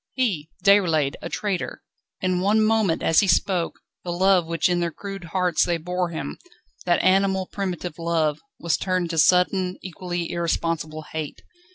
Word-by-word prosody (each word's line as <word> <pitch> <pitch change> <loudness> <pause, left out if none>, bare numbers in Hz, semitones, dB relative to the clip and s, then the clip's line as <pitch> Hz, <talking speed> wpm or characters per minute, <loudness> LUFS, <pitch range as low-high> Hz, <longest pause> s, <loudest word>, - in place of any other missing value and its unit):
He, 195 - 0 0.2
Déroulède, 165 -8 +4
a - - -5
traitor! 200 -4 -3 0.4
In 185 -1 +1
one 215 +3 +3
moment, 215 -6 +2
as 165 - +4
he 200 - +3
spoke, 180 -1 +1 0.3
the 175 - -4
love 185 -1 +3
which 165 0 +1
in 175 -1 +1
their 170 -1 0
crude 195 +2 -8
hearts 180 0 +1
they 170 -1 0
bore 180 +2 -2
him, 75 - -5 0.5
that 175 - +3
animal 190 0 +3
primitive 180 -4 -4
love, 160 -3 0 0.2
was 170 - +1
turned 185 -2 -1
to 165 - 0
sudden, 180 +3 +3
equally 175 -1 -4
irresponsible 165 -2 -2
hate. 155 -2 -5
175 Hz, 160 wpm, -24 LUFS, 165-190 Hz, 0.5 s, Déroulède